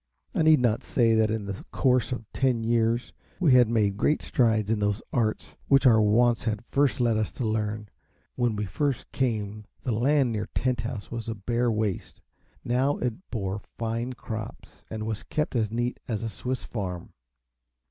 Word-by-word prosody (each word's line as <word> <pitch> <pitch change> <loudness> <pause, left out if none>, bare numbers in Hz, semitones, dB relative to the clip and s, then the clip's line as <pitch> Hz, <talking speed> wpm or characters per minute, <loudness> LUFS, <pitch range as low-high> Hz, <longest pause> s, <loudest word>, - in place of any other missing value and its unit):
I - - +1
need 155 -2 +6
not 120 -3 +2
say 115 -3 +2
that 110 -1 +3
in 110 -2 -2
the 100 0 -6
course 125 -2 +2
of 120 -3 -4
ten 125 -4 +1
years 115 +1 +1 0.3
we 165 -8 +4
had 125 -3 +6
made 105 -4 +1
great 150 +7 +1
strides 110 -4 +2
in 110 - +1
those 105 0 0
arts 110 -3 -1
which 135 0 +4
our 110 -3 +7
wants 115 +3 +3
had 110 0 -2
first 140 +2 +1
led 120 -3 +2
us 110 - -1
to 125 - -3
learn. 105 -1 -1 0.5
When 120 -3 0
we 105 0 -2
first 135 - -2
came 110 -5 -2 0.2
the 125 - -1
land 130 +3 +2
near 105 -1 -2
Tent 125 -3 +1
House 115 -2 -6
was 115 -1 -4
a 115 - -3
bare 120 +3 0
waste; 105 -3 -2 0.5
now 130 +4 +1
it 125 - -4
bore 100 -3 -3
fine 115 +4 -4
crops, 110 -3 -8
and 110 -1 -4
was 110 -1 -3
kept 150 -3 -2
as 110 -3 +1
neat 120 +2 -2
as 115 -1 -2
a 115 - -2
Swiss 125 +4 -4
farm. 90 -6 -5
115 Hz, 185 wpm, -27 LUFS, 110-125 Hz, 0.5 s, our